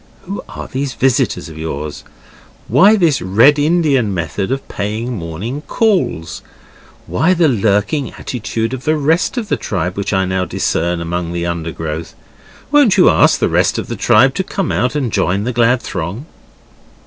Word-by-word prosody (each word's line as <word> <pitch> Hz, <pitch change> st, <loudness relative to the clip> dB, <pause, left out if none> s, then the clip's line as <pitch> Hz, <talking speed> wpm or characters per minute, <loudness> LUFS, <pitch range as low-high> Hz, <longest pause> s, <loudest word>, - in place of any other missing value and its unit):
Who 195 Hz, +2 st, -5 dB
are -, -, -7 dB
these 135 Hz, -1 st, -4 dB
visitors 130 Hz, -8 st, +1 dB
of 80 Hz, -1 st, -10 dB
yours? 75 Hz, -2 st, -5 dB, 0.6 s
Why 190 Hz, -, +5 dB
this 165 Hz, -, +2 dB
Red 115 Hz, +11 st, +4 dB
Indian 145 Hz, -8 st, +2 dB
method 95 Hz, +4 st, -3 dB
of 135 Hz, 0 st, -3 dB
paying 110 Hz, +5 st, -3 dB
morning 100 Hz, -, -5 dB
calls? 195 Hz, -, 0 dB, 0.6 s
Why 160 Hz, -, +1 dB
the 165 Hz, -2 st, +3 dB
lurking 110 Hz, +4 st, 0 dB
attitude 115 Hz, -1 st, -4 dB
of 130 Hz, 0 st, -5 dB
the 155 Hz, -, +2 dB
rest 160 Hz, -, +1 dB
of 230 Hz, -3 st, -2 dB
the -, -, 0 dB
tribe 90 Hz, -3 st, -3 dB
which 100 Hz, -, -3 dB
I 95 Hz, -1 st, +1 dB
now 95 Hz, 0 st, -1 dB
discern 85 Hz, 0 st, -1 dB
among 85 Hz, 0 st, -3 dB
the 85 Hz, 0 st, -2 dB
undergrowth? 80 Hz, -1 st, -4 dB, 0.6 s
Won't 285 Hz, -9 st, +4 dB
you 185 Hz, -, +6 dB
ask -, -, +4 dB
the -, -, +1 dB
rest -, -, +1 dB
of -, -, -4 dB
the -, -, -3 dB
tribe 130 Hz, +5 st, +4 dB
to 190 Hz, -, -1 dB
come 190 Hz, -1 st, -3 dB
out 125 Hz, +3 st, 0 dB
and 130 Hz, -7 st, -1 dB
join 95 Hz, +3 st, +1 dB
the 125 Hz, +3 st, -2 dB
glad 120 Hz, 0 st, +2 dB
throng? 95 Hz, -, -5 dB
115 Hz, 170 wpm, -16 LUFS, 90-145 Hz, 0.6 s, you